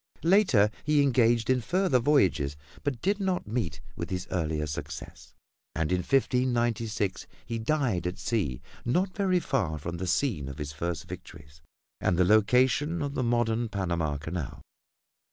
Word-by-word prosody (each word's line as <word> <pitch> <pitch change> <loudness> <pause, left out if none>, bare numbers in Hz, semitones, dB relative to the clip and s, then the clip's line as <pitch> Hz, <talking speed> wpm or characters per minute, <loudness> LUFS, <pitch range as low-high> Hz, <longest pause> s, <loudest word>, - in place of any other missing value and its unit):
Later 165 - +4
he 150 -1 +3
engaged 120 -4 +3
in 130 -1 +2
further 175 - +2
voyages, 95 - +2 0.3
but 135 -5 -2
did 200 +3 +1
not 190 -2 -1
meet 100 - -3
with 85 - -5
his 90 0 -3
earlier 80 -4 -1
success, 75 0 -7 0.4
and 80 0 0
in 90 - +2
1596 120 -4 0 0.2
he 115 -1 -3
died 115 - 0
at 90 - -4
sea 75 - -2 0.2
not 180 +10 0
very 190 -4 +2
far 95 - -1
from 85 +3 -5
the 90 +2 -3
scene 90 - 0
of 70 - -7
his 75 -2 -4
first 85 +1 -4
victories 75 0 -11 0.4
and 90 - +1
the 90 - +4
location 125 - +3
of 140 -1 -3
the 135 - -1
modern 120 -1 +1
Panama 85 -7 -1
Canal. 80 0 -5
110 Hz, 155 wpm, -28 LUFS, 85-135 Hz, 0.4 s, Later